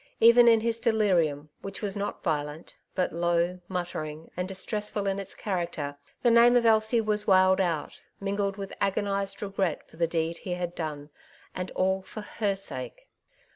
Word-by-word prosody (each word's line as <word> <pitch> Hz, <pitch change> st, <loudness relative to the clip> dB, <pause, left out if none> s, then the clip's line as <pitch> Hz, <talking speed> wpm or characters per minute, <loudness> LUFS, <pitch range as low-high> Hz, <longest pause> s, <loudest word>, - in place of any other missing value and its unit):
Even 235 Hz, +1 st, +7 dB
in 225 Hz, -1 st, +6 dB
his 230 Hz, 0 st, 0 dB
delirium, 180 Hz, -, +1 dB
which 195 Hz, +2 st, -7 dB
was 200 Hz, -2 st, -1 dB
not 205 Hz, 0 st, -4 dB
violent, 150 Hz, -1 st, -3 dB, 0.2 s
but 185 Hz, -, 0 dB
low, 175 Hz, +1 st, +1 dB
muttering, 160 Hz, -4 st, -5 dB
and 180 Hz, +1 st, -2 dB
distressful 205 Hz, +2 st, -2 dB
in 195 Hz, 0 st, 0 dB
its 195 Hz, -1 st, -4 dB
character, 170 Hz, -7 st, -3 dB, 0.3 s
the 240 Hz, -, +5 dB
name 235 Hz, +1 st, +7 dB
of 240 Hz, -1 st, +4 dB
Elsie 220 Hz, +1 st, +4 dB
was 210 Hz, -1 st, -1 dB
wailed 190 Hz, -1 st, +5 dB
out, 170 Hz, -5 st, -2 dB, 0.2 s
mingled 200 Hz, 0 st, -1 dB
with 195 Hz, -1 st, -6 dB
agonized 195 Hz, 0 st, -1 dB
regret 195 Hz, -4 st, -2 dB
for -, -, -18 dB
the 170 Hz, 0 st, +2 dB
deed 165 Hz, 0 st, -1 dB
he 180 Hz, -2 st, -3 dB
had 175 Hz, -1 st, -3 dB
done, 150 Hz, -3 st, -5 dB, 0.4 s
and 180 Hz, 0 st, -4 dB
all 190 Hz, +1 st, +1 dB
for 215 Hz, +3 st, -8 dB
her 210 Hz, -1 st, -1 dB
sake. 130 Hz, -, -6 dB
190 Hz, 170 wpm, -28 LUFS, 170-210 Hz, 0.4 s, Even